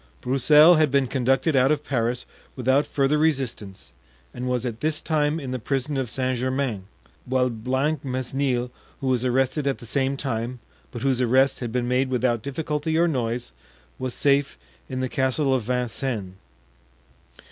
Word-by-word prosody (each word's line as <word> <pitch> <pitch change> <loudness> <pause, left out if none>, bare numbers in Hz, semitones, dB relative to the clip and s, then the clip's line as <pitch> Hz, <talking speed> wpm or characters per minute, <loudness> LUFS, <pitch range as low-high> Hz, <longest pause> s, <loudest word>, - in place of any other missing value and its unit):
Broussel 150 +6 +6
had 155 -2 +4
been 140 0 +2
conducted 135 +4 +1
out 135 +2 +4
of 150 -1 0
Paris 120 -2 -1 0.3
without 130 +3 +2
further 140 +2 +1
resistance, 130 -10 -2 0.4
and 125 +1 -4
was 125 0 -1
at 115 -2 -4
this 155 +2 0
time 155 0 0
in 135 -4 -6
the 130 - -3
prison 135 +4 -2
of 130 -3 -2
Saint 130 0 -1
Germain; 130 -6 -2 0.4
while 125 0 +1
Blancmesnil, 130 0 -1 0.3
who - - -6
was 130 -2 +1
arrested 130 +3 +1
at 135 - 0
the - - -11
same 135 +3 0
time, 125 -2 -3 0.3
but 120 - -7
whose 130 -2 +1
arrest 130 +3 +3
had 120 -3 -4
been 120 0 -1
made 130 +1 +1
without 125 -2 +1
difficulty 150 +3 -2
or 170 +1 +4
noise, 120 - -2 0.5
was 130 -1 -3
safe 140 0 +1 0.3
in 130 0 -3
the 130 - 0
Castle 130 +2 +1
of 130 - +1
Vincennes. 125 -5 -2
130 Hz, 160 wpm, -24 LUFS, 125-140 Hz, 0.5 s, Broussel